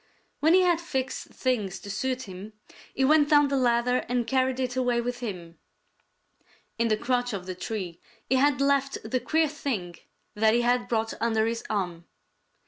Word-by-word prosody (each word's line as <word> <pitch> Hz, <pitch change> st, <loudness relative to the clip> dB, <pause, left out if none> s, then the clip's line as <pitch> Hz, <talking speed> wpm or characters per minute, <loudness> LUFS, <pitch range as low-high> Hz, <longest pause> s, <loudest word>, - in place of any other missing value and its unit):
When 320 Hz, +4 st, +5 dB
he 375 Hz, -, +6 dB
had 350 Hz, -2 st, +2 dB
fixed 265 Hz, -6 st, -3 dB
things 215 Hz, -8 st, -2 dB
to 200 Hz, -, -7 dB
suit 255 Hz, +6 st, -2 dB
him, 195 Hz, +2 st, -9 dB, 0.4 s
he 265 Hz, -, +2 dB
went 295 Hz, +1 st, +4 dB
down 290 Hz, -2 st, +5 dB
the 280 Hz, -, 0 dB
ladder 250 Hz, -1 st, +2 dB
and 245 Hz, -1 st, 0 dB
carried 260 Hz, 0 st, +1 dB
it 255 Hz, -1 st, -2 dB
away 250 Hz, -2 st, +1 dB
with 245 Hz, +1 st, -3 dB
him. 180 Hz, -8 st, -7 dB, 1.2 s
In 230 Hz, -, +3 dB
the 215 Hz, -1 st, +2 dB
crotch 245 Hz, 0 st, -1 dB
of 190 Hz, -3 st, -5 dB
the 185 Hz, -, -4 dB
tree 185 Hz, -2 st, -5 dB, 0.3 s
he 260 Hz, -, +2 dB
had 275 Hz, 0 st, +3 dB
left 275 Hz, 0 st, +2 dB
the 255 Hz, +4 st, 0 dB
queer 315 Hz, +6 st, +1 dB
thing 230 Hz, -, -4 dB, 0.4 s
that 220 Hz, +1 st, +3 dB
he 240 Hz, -, +3 dB
had 245 Hz, 0 st, +1 dB
brought 225 Hz, -1 st, -1 dB
under 220 Hz, -1 st, +2 dB
his 230 Hz, 0 st, -2 dB
arm. 180 Hz, -5 st, -2 dB
245 Hz, 180 wpm, -27 LUFS, 215-265 Hz, 1.2 s, he